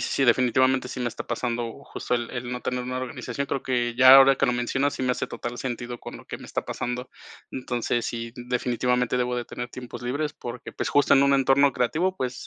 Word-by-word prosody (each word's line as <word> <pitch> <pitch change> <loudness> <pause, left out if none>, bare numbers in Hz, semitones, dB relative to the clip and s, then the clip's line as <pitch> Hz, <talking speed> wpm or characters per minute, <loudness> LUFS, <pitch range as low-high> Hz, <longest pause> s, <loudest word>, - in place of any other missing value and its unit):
sí, 135 - 0
definitivamente, 130 +2 +3
sí 125 - -6
me 125 - 0
está - - -7
pasando, 120 +1 -3
justo 125 - -3
el 120 -1 -2
el 125 -1 -5
no 125 - -4
tener 125 -1 -3
una 125 0 -3
organización. 130 +1 -4
Creo 135 -1 -2
que 120 -2 -1
ya 130 +1 +9
ahora 135 0 +8
que 135 - +2
lo 125 - +2
mencionas, 130 +4 0
sí - - -4
me 125 - +1
hace - - -1
total 120 0 -6
sentido 120 -1 -4
con - - -9
lo - - -14
que - - -6
me - - -12
está - - -3
pasando. 125 +1 -4 0.4
Entonces 120 -2 -2
sí, 115 -1 -5
definitivamente 125 0 0
debo 125 0 0
de 120 - -3
tener 120 0 -6
tiempos 125 -1 -8
libres, 145 +4 -2
porque 120 0 -8
pues, - - -3
justo 145 -1 +4
en 135 - +5
un 140 0 +4
entorno 135 +1 +4
creativo, 175 +10 0
pues 125 -1 -4
125 Hz, 225 wpm, -25 LUFS, 120-130 Hz, 0.4 s, ya